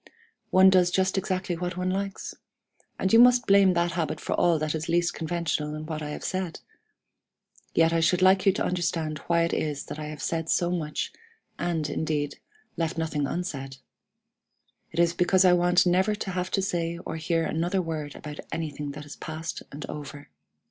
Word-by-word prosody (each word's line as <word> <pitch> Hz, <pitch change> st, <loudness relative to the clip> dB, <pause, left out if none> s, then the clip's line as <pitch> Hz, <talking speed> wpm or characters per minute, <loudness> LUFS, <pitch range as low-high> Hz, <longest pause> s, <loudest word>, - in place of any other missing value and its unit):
One 190 Hz, 0 st, +7 dB
does 180 Hz, -2 st, +5 dB
just 190 Hz, +1 st, +1 dB
exactly 185 Hz, -2 st, -1 dB
what 175 Hz, +1 st, -4 dB
one 185 Hz, 0 st, 0 dB
likes 195 Hz, +1 st, -3 dB, 0.6 s
and 190 Hz, -, 0 dB
you 225 Hz, -, +8 dB
must 245 Hz, 0 st, +6 dB
blame 195 Hz, -2 st, +5 dB
that 170 Hz, 0 st, +1 dB
habit 165 Hz, -4 st, -2 dB
for -, -, -3 dB
all 170 Hz, -2 st, +3 dB
that 155 Hz, 0 st, -1 dB
is 160 Hz, +1 st, -4 dB
least 175 Hz, +1 st, +2 dB
conventional 160 Hz, -2 st, -2 dB
in 155 Hz, 0 st, -6 dB
what 155 Hz, -1 st, -4 dB
I 150 Hz, -, -4 dB
have 150 Hz, -, -6 dB
said. 185 Hz, -3 st, -3 dB, 1.2 s
Yet 165 Hz, 0 st, +4 dB
I 165 Hz, -, +3 dB
should 170 Hz, +2 st, +3 dB
like 190 Hz, +1 st, +5 dB
you -, -, +8 dB
to -, -, -1 dB
understand 165 Hz, -3 st, -1 dB
why 170 Hz, -1 st, +3 dB
it 170 Hz, -, -1 dB
is 145 Hz, -2 st, -2 dB
that 155 Hz, -, -7 dB
I 150 Hz, -, -4 dB
have 150 Hz, -1 st, -7 dB
said 165 Hz, -1 st, -2 dB
so 175 Hz, 0 st, +2 dB
much, 155 Hz, -4 st, -3 dB, 0.5 s
and, 165 Hz, -3 st, -1 dB
indeed, 150 Hz, -1 st, -2 dB, 0.4 s
left 165 Hz, -1 st, -1 dB
nothing 155 Hz, -3 st, -1 dB
unsaid. 135 Hz, -7 st, -4 dB, 1.1 s
It 165 Hz, -, -10 dB
is 170 Hz, 0 st, +3 dB
because 185 Hz, +2 st, +3 dB
I 180 Hz, -, +7 dB
want 175 Hz, 0 st, +4 dB
never 185 Hz, +4 st, +3 dB
to 205 Hz, -2 st, -4 dB
have 180 Hz, 0 st, -2 dB
to 195 Hz, 0 st, 0 dB
say 170 Hz, -3 st, -1 dB
or 160 Hz, -, -4 dB
hear 165 Hz, +1 st, 0 dB
another 175 Hz, +5 st, 0 dB
word 155 Hz, -4 st, -4 dB
about 150 Hz, 0 st, -8 dB
anything 150 Hz, -3 st, -4 dB
that 150 Hz, +1 st, -8 dB
is 145 Hz, -, -9 dB
past 160 Hz, 0 st, -5 dB
and 145 Hz, +2 st, -7 dB
over. 145 Hz, -1 st, -8 dB
170 Hz, 190 wpm, -27 LUFS, 155-180 Hz, 1.2 s, you